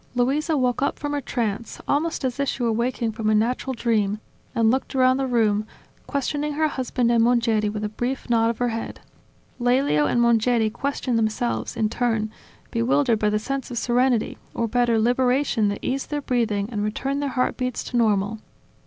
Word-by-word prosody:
Luisa 285 +6 +1
woke 250 -1 +1
up 280 - 0
from 290 0 -4
her 290 - -1
trance, 230 -3 -3
almost 300 0 0
as 255 +1 -2
if 280 - +1
she 250 - -3
were 230 - +2
waking 235 0 -1
from 220 -1 -2
a 215 - +4
natural 250 +4 0
dream, 215 -3 0 0.4
and 225 -1 +4
looked 265 +2 -2
around 255 0 +4
the 270 -1 -1
room, 215 -4 +2 0.4
questioning 290 +2 -1
her 310 +1 +2
husband 250 -3 0
and 230 -1 +4
Mongeri 230 -3 +2
with 210 0 -4
a - - 0
brief 245 +5 -3
nod 230 -2 +3
of 230 - -2
her 245 0 0
head. 225 0 -5 0.6
Lelio 245 - +2
and 240 - +1
Mongeri 235 -1 +3
questioned 255 -1 -1
themselves, 120 - -1
in 220 - +2
turn, 225 -2 -1 0.4
bewildered 240 0 +2
by 210 - +2
the 210 - +1
sense 270 +5 -4
of 245 - -5
serenity, 245 -1 +1 0.2
or 230 - 0
better 240 0 +2
liberation 245 0 +2
that 200 0 -1
eased 270 +1 -2
their 295 - -1
breathing 225 -6 0
and 210 -3 -2
returned 270 +7 -2
their 285 - -1
heartbeats 255 -1 -1
to - - -6
normal. 215 -2 +2
240 Hz, 190 wpm, -23 LUFS, 220-260 Hz, 0.6 s, a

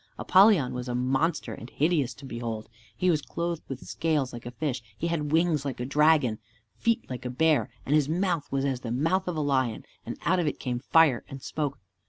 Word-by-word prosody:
Apollyon 190 - +5
was 125 0 -4
a 120 - -2
monster 135 0 0
and 115 - -9
hideous 145 -6 +1
to 140 - -12
behold. 115 -3 -5 0.3
He 180 0 +3
was 155 -3 +1
clothed 170 +3 -3
with 135 -2 -7
scales 150 -5 0
like 120 0 -8
a - - -3
fish, 130 -1 -3 0.2
he - - -3
had 155 -3 -1
wings 160 -3 +2
like 140 -4 -4
a 125 - -2
dragon, 145 -5 +3 0.3
feet 230 0 0
like 125 -1 -6
a 125 - -3
bear, 155 +4 +2 0.2
and 140 - 0
his 150 -2 +3
mouth 175 -3 0
was 135 0 0
as 135 -3 -1
the 125 - -6
mouth 165 +11 +1
of 180 - -2
a - - 0
lion, 130 -6 0 0.2
and - - -6
out 185 +1 +3
of 170 - 0
it 145 - -2
came 125 -2 -2
fire 140 -1 +4
and 135 -1 -9
smoke. 145 -3 -3
145 Hz, 220 wpm, -27 LUFS, 125-165 Hz, 0.3 s, Apollyon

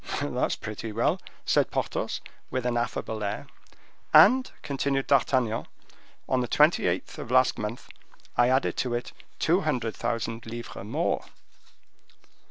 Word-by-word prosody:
"That's - - 0
pretty 110 +1 -6
well," 115 +3 +1 0.2
said - - +3
Porthos, - - -2 0.3
with 130 -1 -2
an 120 -1 +1
affable 110 -2 -2
air. 100 - -3 0.7
"And," 260 +1 +7
continued 135 -1 -1
D'Artagnan, 130 -4 +2 0.6
"on 130 -1 +2
the 125 - -1
twenty - - +4
eighth - - -2
of - - -6
last 130 +1 +4
month 105 +3 -5 0.5
I 120 0 +4
added 130 +1 +2
to 125 -2 0
it 120 - -4 0.3
two 175 +4 +2
hundred 125 - -1
thousand 115 -1 -3
livres 120 -3 -7
more." 105 - -1
120 Hz, 135 wpm, -27 LUFS, 115-130 Hz, 0.7 s, And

